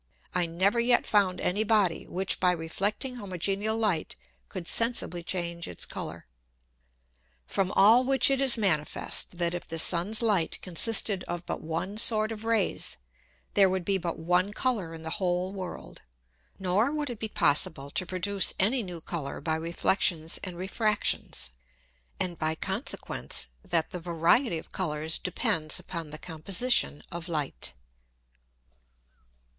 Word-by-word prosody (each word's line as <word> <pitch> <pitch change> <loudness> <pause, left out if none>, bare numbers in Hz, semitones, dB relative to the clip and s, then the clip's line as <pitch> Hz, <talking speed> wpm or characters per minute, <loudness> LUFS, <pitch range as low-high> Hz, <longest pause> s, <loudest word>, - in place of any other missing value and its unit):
I 180 -1 +1
never 190 +7 +1
yet 240 +1 +3
found 195 -4 +2
any 205 +4 0
Body, 210 -6 +1
which 190 +1 -1
by 180 -1 +3
reflecting 200 - -3
homogeneal 200 +2 -2
Light 205 -8 0 0.3
could 170 - -7
sensibly 230 -7 +2
change 170 -1 -3
its 85 - -5
Colour. - - -7 1.2
From 190 - -1
all 225 +6 +6
which 265 0 +3
it 270 0 +1
is 265 -3 +4
manifest, 175 -2 0
that 170 0 0
if 175 - -5
the 165 - -4
Sun's 185 +7 +5
Light 200 -8 +1
consisted 195 +1 +2
of 175 0 -5
but - - -4
one 165 +6 -4
sort 215 -1 +5
of 220 0 -7
Rays, 225 -4 +1 0.6
there 195 -2 +5
would 185 -1 -2
be 195 0 +1
but 170 -1 -3
one 180 +4 +1
Colour 210 -10 -2
in 160 - -10
the 160 - -4
whole 180 +1 0
World, 185 -3 -8 0.6
nor 195 +7 +1
would 295 -3 -2
it 230 - -8
be 220 - -4
possible 140 -4 +2
to 185 - -1
produce 185 +2 +1
any 235 +7 +3
new 180 -5 -7
Colour 155 -4 -5
by 160 - -1
Reflexions 165 0 +1
and 180 -2 -5
Refractions, 205 - -1 0.7
and 175 -3 -1
by 155 0 +1
consequence 195 - -4 0.2
that 175 -5 -1
the 180 - -5
variety 170 - +2
of 160 - -10
Colours 160 -3 -2
depends 180 -5 0
upon 165 -4 -6
the 155 - -7
Composition 180 +2 0
of 170 0 -6
Light. 150 - -3
185 Hz, 145 wpm, -28 LUFS, 170-215 Hz, 1.2 s, all